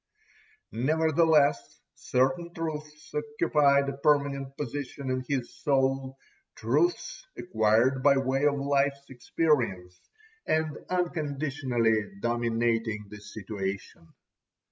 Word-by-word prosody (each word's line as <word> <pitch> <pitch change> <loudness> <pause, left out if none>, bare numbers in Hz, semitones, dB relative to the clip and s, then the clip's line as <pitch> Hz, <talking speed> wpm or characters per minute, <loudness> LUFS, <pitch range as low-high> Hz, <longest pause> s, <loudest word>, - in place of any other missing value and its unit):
Nevertheless 155 0 +2
certain 135 +7 0
truths 150 -2 -6
occupied 150 -2 +2
a 140 -1 -4
permanent 140 -1 +1
position 140 -1 -4
in 130 0 -1
his 130 -4 -2
soul, 135 -1 0 0.4
truths 360 +7 -1
acquired 115 -1 +2
by 140 0 +5
way 135 +1 +1
of 145 - +2
life's 140 0 0
experience, 120 - -1 0.4
and 155 -2 0
unconditionally 140 - -1
dominating 115 -2 -1
the 105 - -9
situation. 100 -4 -6
135 Hz, 90 wpm, -28 LUFS, 120-150 Hz, 0.4 s, by